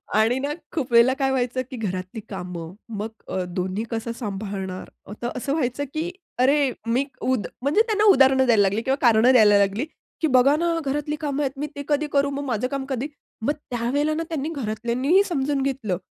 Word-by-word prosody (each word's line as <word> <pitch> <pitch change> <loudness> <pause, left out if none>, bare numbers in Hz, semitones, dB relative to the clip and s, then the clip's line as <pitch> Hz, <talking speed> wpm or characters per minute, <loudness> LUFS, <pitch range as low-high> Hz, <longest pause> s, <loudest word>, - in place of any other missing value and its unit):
आणि 225 +4 +3
ना, 285 +2 -2 0.2
खूप 275 -6 -2
वेळेला 235 +2 +6
काय 270 0 0
व्हायचं, 255 -1 0
की 255 - -5
घरातली 185 -1 -4
कामं, 180 -3 -6 0.2
मग 215 0 -4 0.2
अ, 185 - -2
दोन्ही 185 +3 -3
कसं 230 0 -2
सांभाळणार 195 -4 -5 0.2
अ, - - -11
त - - -3
असं 275 +2 -2
व्हायचं 285 -2 -1
की 325 +3 -2 0.3
अरे 275 +1 +4 0.2
मीक 265 +4 -1
उद 255 -5 0
म्हणजे 285 +10 +3
त्यांना 425 -1 +1
उदाहरणं 265 -2 +5
द्यायला 225 -4 +4
लागली 200 +3 +2
किंवा 265 +3 +1
कारणं 235 0 +5
द्यायला 215 -5 +6
लागली. 200 +6 +1 0.4
की 320 - +3
"बघा 260 +3 +6
ना, 340 +2 0 0.2
घरातली 295 +2 -1
कामं 290 -1 -1
आहेत. 270 - 0
मी 295 - -2
ते 285 - -5
कधी 300 0 +1
करू, 280 0 +3
मग 280 0 -3
माझं 250 -3 -1
काम 275 0 -3
कधी?" 265 +1 -2 0.4
मग 290 - +2
त्यावेळेला 285 +2 -1
ना, 325 +2 -1
त्यांनी 310 -1 -2
घरातल्यांनीही 255 - +1
समजून 285 -5 -1
घेतलं. 260 -9 -1
255 Hz, 195 wpm, -24 LUFS, 220-285 Hz, 0.4 s, वेळेला